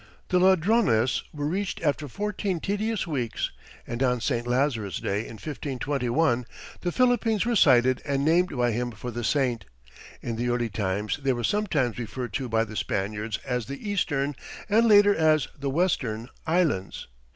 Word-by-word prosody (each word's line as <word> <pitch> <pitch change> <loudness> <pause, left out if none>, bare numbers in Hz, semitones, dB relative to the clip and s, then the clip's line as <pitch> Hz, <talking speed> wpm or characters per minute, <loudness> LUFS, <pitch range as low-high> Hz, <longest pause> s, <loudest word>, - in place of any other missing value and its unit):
The 180 - +3
Ladrones 185 - +3
were 145 -1 -4
reached 190 +6 -2
after 145 -1 0
fourteen 200 - -2
tedious 205 +3 -1
weeks, 130 -9 -2 0.3
and 120 +1 -5
on 125 -2 +2
St. 120 0 -1
Lazarus' 120 -6 0
day, 100 - -1
in - - -9
1521, 135 -1 -1 0.3
the 175 - -2
Philippines 240 -2 +2
were 240 0 +1
sighted 130 - +5
and 140 0 -1
named 170 -2 +2
by 120 -1 +2
him 120 +2 -1
for 120 +1 -7
the 120 +1 -4
saint. 120 -4 0 0.6
In 115 -2 -3
the 120 +1 -1
early 120 -1 0
times 100 +3 -2
they 135 -1 +2
were 120 -1 -4
sometimes 145 - 0
referred 120 -1 -5
to 130 +2 -2
by 110 0 +2
the 110 -1 -8
Spaniards 105 +2 -2
as 125 -3 -2
the 140 +9 -7
Eastern, 145 -8 0 0.3
and 225 +3 +4
later 205 -1 +7
as 155 -4 +3
the 140 -1 -3
Western, 130 -8 0 0.2
Islands. 160 - 0
135 Hz, 165 wpm, -26 LUFS, 120-180 Hz, 0.6 s, later